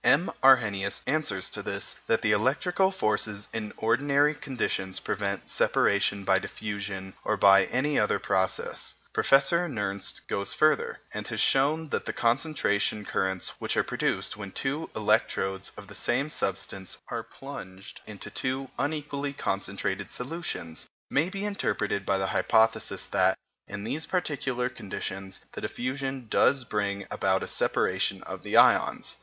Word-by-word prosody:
M. 150 Hz, +7 st, +4 dB
Arrhenius 105 Hz, -7 st, +4 dB
answers 125 Hz, -12 st, 0 dB
to -, -, -3 dB
this -, -, -4 dB
that 115 Hz, -, +2 dB
the 110 Hz, -, +3 dB
electrical 140 Hz, -, +2 dB
forces 110 Hz, -, -1 dB
in 105 Hz, -2 st, -3 dB
ordinary 140 Hz, +6 st, +3 dB
conditions 120 Hz, -9 st, -2 dB
prevent 100 Hz, -1 st, -3 dB
separation 100 Hz, 0 st, +2 dB
by 95 Hz, 0 st, +3 dB
diffusion 100 Hz, -2 st, -5 dB
or 110 Hz, -, 0 dB
by 100 Hz, -1 st, +7 dB
any 145 Hz, +3 st, +1 dB
other 105 Hz, -, +2 dB
process. 95 Hz, -1 st, -1 dB, 0.2 s
Professor 140 Hz, +6 st, +4 dB
Nernst 100 Hz, -6 st, -2 dB
goes 100 Hz, 0 st, 0 dB
further, 155 Hz, 0 st, +3 dB, 0.2 s
and -, -, -4 dB
has -, -, -3 dB
shown 150 Hz, +4 st, +3 dB
that -, -, -2 dB
the -, -, -3 dB
concentration 115 Hz, -5 st, +1 dB
currents 95 Hz, -2 st, -1 dB
which -, -, -1 dB
are -, -, +4 dB
produced -, -, -1 dB
when 100 Hz, -2 st, -7 dB
two 145 Hz, +8 st, -2 dB
electrodes 100 Hz, -3 st, +1 dB
of 100 Hz, -, -9 dB
the -, -, -11 dB
same 140 Hz, +5 st, 0 dB
substance 95 Hz, -3 st, -2 dB
are 115 Hz, -1 st, -2 dB
plunged 105 Hz, -6 st, -10 dB
into 105 Hz, -2 st, -8 dB
two 130 Hz, 0 st, -2 dB
unequally 145 Hz, -1 st, -2 dB
concentrated -, -, -2 dB
solutions 125 Hz, -, -4 dB, 0.2 s
may 155 Hz, +5 st, +2 dB
be 195 Hz, +1 st, -4 dB
interpreted 105 Hz, -, -1 dB
by 100 Hz, -, +3 dB
the 95 Hz, -, 0 dB
hypothesis 110 Hz, 0 st, +2 dB
that, 95 Hz, +1 st, +2 dB, 0.3 s
in 100 Hz, -, -6 dB
these 155 Hz, +8 st, -3 dB
particular 140 Hz, -8 st, -1 dB
conditions, 95 Hz, -5 st, -6 dB
the -, -, -7 dB
diffusion 135 Hz, +1 st, -3 dB
does 135 Hz, +4 st, +3 dB
bring 100 Hz, -3 st, -2 dB
about 95 Hz, 0 st, +1 dB
a -, -, -4 dB
separation -, -, +1 dB
of -, -, -7 dB
the -, -, 0 dB
ions. -, -, +4 dB
110 Hz, 145 wpm, -28 LUFS, 100-140 Hz, 0.3 s, by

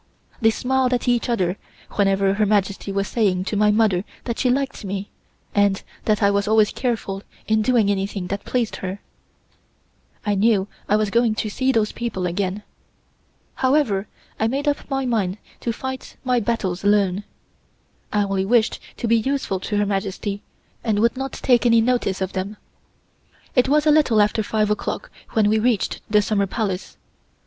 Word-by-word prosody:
They 225 Hz, -, +5 dB
smiled 255 Hz, +1 st, +1 dB
to 245 Hz, -, +1 dB
each 240 Hz, 0 st, 0 dB
other 185 Hz, -5 st, 0 dB, 0.3 s
whenever 195 Hz, -1 st, +2 dB
Her 210 Hz, +1 st, +2 dB
Majesty 200 Hz, -1 st, 0 dB
was 195 Hz, 0 st, -1 dB
saying 195 Hz, -6 st, +1 dB
to 210 Hz, -, -2 dB
my 210 Hz, +1 st, +4 dB
mother 210 Hz, -4 st, +3 dB, 0.2 s
that 235 Hz, -2 st, -3 dB
she 255 Hz, -, +2 dB
liked 275 Hz, 0 st, -1 dB
me, 195 Hz, 0 st, -4 dB, 0.4 s
and 200 Hz, -1 st, +2 dB, 0.2 s
that 215 Hz, -1 st, +2 dB
I 200 Hz, -, +5 dB
was 200 Hz, 0 st, 0 dB
always 215 Hz, -1 st, +4 dB
careful 225 Hz, -6 st, -2 dB, 0.3 s
in 220 Hz, 0 st, +3 dB
doing 225 Hz, -2 st, +3 dB
anything 195 Hz, -1 st, -2 dB
that 200 Hz, +2 st, -4 dB
pleased 240 Hz, -3 st, -1 dB
her. 190 Hz, +1 st, -5 dB, 1.3 s
I 210 Hz, -, +2 dB
knew 200 Hz, -1 st, +3 dB, 0.2 s
I 205 Hz, -, +4 dB
was 215 Hz, -1 st, +1 dB
going 235 Hz, -1 st, +3 dB
to 215 Hz, -, -2 dB
see 260 Hz, +4 st, +1 dB
those 220 Hz, -4 st, +1 dB
people 220 Hz, -6 st, -3 dB
again. 190 Hz, +3 st, -2 dB, 0.9 s
However, 260 Hz, -8 st, +1 dB, 0.3 s
I 220 Hz, -, +2 dB
made 275 Hz, +5 st, -2 dB
up 290 Hz, 0 st, -1 dB
my 270 Hz, -1 st, -1 dB
mind 210 Hz, -6 st, 0 dB, 0.2 s
to 235 Hz, -, -2 dB
fight 260 Hz, +3 st, -6 dB
my 250 Hz, -2 st, +2 dB
battles 200 Hz, -5 st, -2 dB
alone. 200 Hz, -1 st, +2 dB, 0.9 s
I 210 Hz, -1 st, +2 dB
only 195 Hz, -1 st, 0 dB
wished 230 Hz, +2 st, +2 dB, 0.2 s
to 235 Hz, -, -2 dB
be 230 Hz, +1 st, +4 dB
useful 245 Hz, -5 st, -1 dB
to 205 Hz, +3 st, -2 dB
Her 205 Hz, -, +2 dB
Majesty, 200 Hz, 0 st, -2 dB, 0.4 s
and 220 Hz, -3 st, +1 dB
would 235 Hz, +4 st, +3 dB
not 270 Hz, +1 st, -4 dB
take 245 Hz, -3 st, +2 dB
any 230 Hz, -1 st, +5 dB
notice 225 Hz, -5 st, +1 dB
of 190 Hz, 0 st, -2 dB
them. 195 Hz, +3 st, -4 dB, 1.0 s
It 250 Hz, 0 st, +4 dB
was 300 Hz, +1 st, +3 dB
a 305 Hz, -, +6 dB
little 295 Hz, -8 st, +4 dB
after 210 Hz, +1 st, +3 dB
five 215 Hz, 0 st, 0 dB
o'clock 210 Hz, -, -3 dB, 0.2 s
when 215 Hz, -2 st, +3 dB
we 215 Hz, +1 st, +3 dB
reached 230 Hz, -2 st, 0 dB
the 210 Hz, 0 st, +4 dB
Summer 200 Hz, -2 st, +1 dB
Palace. 195 Hz, -3 st, -3 dB
210 Hz, 175 wpm, -22 LUFS, 195-240 Hz, 1.3 s, a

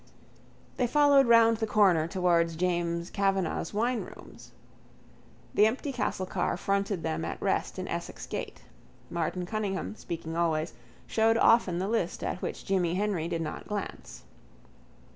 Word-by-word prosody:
They 250 Hz, -, +2 dB
followed 285 Hz, 0 st, +5 dB
round 230 Hz, -1 st, +6 dB
the 220 Hz, 0 st, -1 dB
corner 190 Hz, -7 st, +4 dB
towards 170 Hz, -2 st, +1 dB
James 170 Hz, 0 st, -1 dB
Kavanagh's 195 Hz, -4 st, 0 dB
winerooms. 235 Hz, +3 st, -4 dB, 1.0 s
The 210 Hz, -, +5 dB
empty 265 Hz, +5 st, -2 dB
castle 210 Hz, -6 st, -2 dB
car 180 Hz, -1 st, -1 dB
fronted 200 Hz, -3 st, -1 dB
them 80 Hz, +1 st, -2 dB
at 80 Hz, -, -4 dB
rest -, -, -1 dB
in -, -, -4 dB
Essex -, -, -5 dB
gate. -, -, -6 dB, 0.5 s
Martin 170 Hz, +1 st, -2 dB
Cunningham, 205 Hz, 0 st, -3 dB
speaking 165 Hz, -4 st, -6 dB
always, 160 Hz, -2 st, 0 dB, 0.3 s
showed 225 Hz, 0 st, +2 dB
often 230 Hz, -7 st, +4 dB
the 185 Hz, +2 st, -1 dB
list 215 Hz, -6 st, -1 dB
at -, -, -3 dB
which -, -, -5 dB
Jimmy 180 Hz, -3 st, +1 dB
Henry 195 Hz, -5 st, -1 dB
did 165 Hz, -1 st, -2 dB
not 155 Hz, -, -6 dB
glance. 210 Hz, -1 st, -6 dB
190 Hz, 140 wpm, -29 LUFS, 170-220 Hz, 1.0 s, round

